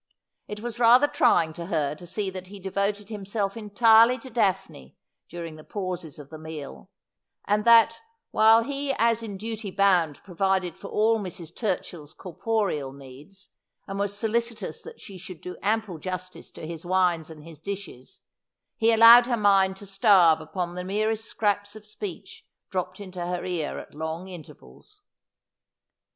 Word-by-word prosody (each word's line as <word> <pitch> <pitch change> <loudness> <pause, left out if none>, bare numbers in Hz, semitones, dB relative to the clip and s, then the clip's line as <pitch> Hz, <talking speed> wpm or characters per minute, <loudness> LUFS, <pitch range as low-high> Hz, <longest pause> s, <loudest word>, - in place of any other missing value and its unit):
It 210 0 -7
was 235 0 -5
rather 245 +4 +6
trying 170 - +2
to 170 +1 -7
her 150 -5 0
to 175 +4 -12
see 195 +2 -3
that 185 -1 -8
he 200 +1 -11
devoted 200 +2 -2
him 210 -3 -6
self 200 0 -2
entirely 225 +2 +5
to 260 -1 -12
Daphne 195 - -2 0.3
during 165 -2 -7
the 155 - -12
pauses 180 -6 -5
of 145 -1 -12
the 155 - -9
meal; 150 - -9 0.6
and 210 +1 +1
that, 230 -1 +6 0.3
while 225 +1 +5
he 280 +2 -2
as 230 -2 +2
in 210 -4 -6
duty 220 0 -5
bound 180 -6 +2
provided 190 -2 -1
for 200 - -10
all 220 +2 +2
Mrs. 175 -4 -8
Turchill's 175 -7 -4
corporeal 185 -6 -2
needs, 140 +9 -14 0.4
and 195 0 -6
was 200 0 -2
solicitous 230 +1 -2
that 465 0 -12
she 195 -2 -11
should 185 -2 -10
do 180 - -8
ample 210 -5 -1
justice 185 +1 -6
to - - -10
his 165 0 -7
wines 175 -3 +1
and 155 -2 -12
his 160 -2 -13
dishes, 195 -9 -8 0.6
he 225 +1 +3
allowed 230 +2 +8
her 240 -2 0
mind 195 -2 +3
to 200 - -11
starve 195 -5 +4
upon 175 +2 -4
the 180 0 -5
merest 215 +3 -1
scraps 205 -1 -1
of 215 -1 -12
speech 365 - -8 0.2
dropped 185 0 -3
into 185 -3 -7
her 180 0 -3
ear 175 -5 -3
at - - -10
long 160 +4 -5
intervals. 190 - -14
195 Hz, 165 wpm, -26 LUFS, 170-220 Hz, 0.6 s, allowed